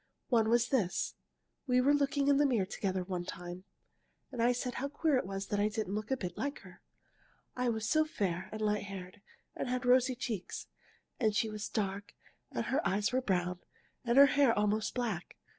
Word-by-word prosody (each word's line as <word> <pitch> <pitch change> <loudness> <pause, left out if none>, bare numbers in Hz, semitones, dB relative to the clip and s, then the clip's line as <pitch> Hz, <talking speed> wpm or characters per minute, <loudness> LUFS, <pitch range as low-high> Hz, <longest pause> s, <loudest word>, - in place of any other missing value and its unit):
One 225 -4 +3
was 240 +1 +3
this. 215 -10 0 0.5
We 250 -1 +4
were 275 +3 +4
looking 280 0 +1
in 285 -1 +5
the 290 - +4
mirror 230 -8 +2
together 190 -1 -2
one 180 -1 -3
time, 175 +1 -7 0.7
and 245 -3 -3
I 240 +1 +5
said 250 0 -2
how 280 - 0
queer 295 +1 +1
it 250 - -1
was 195 0 -4
that 205 - 0
I 205 - +3
didn't 215 -2 -3
look 215 0 -3
a 265 - +1
bit 180 -6 -5
like 280 +6 -3
her. - - -15 0.7
I 250 -1 0
was 220 -2 -1
so 310 0 +4
fair 190 - -2
and 215 - -5
light 210 -1 +1
haired, 195 0 -8 0.3
and - - -3
had 250 0 -1
rosy 255 +1 +4
cheeks, 225 -6 -4 0.5
and 215 -4 +2
she 220 0 +1
was 210 -1 -5
dark 200 -1 -3 0.3
and - - -3
her 275 +4 +1
eyes 205 +4 +1
were 255 +1 +1
brown 180 -5 0 0.4
and 235 +1 +1
her 280 - +11
hair 280 -3 +3
almost 210 +1 +1
black. 225 -8 -3
220 Hz, 200 wpm, -33 LUFS, 195-255 Hz, 0.7 s, her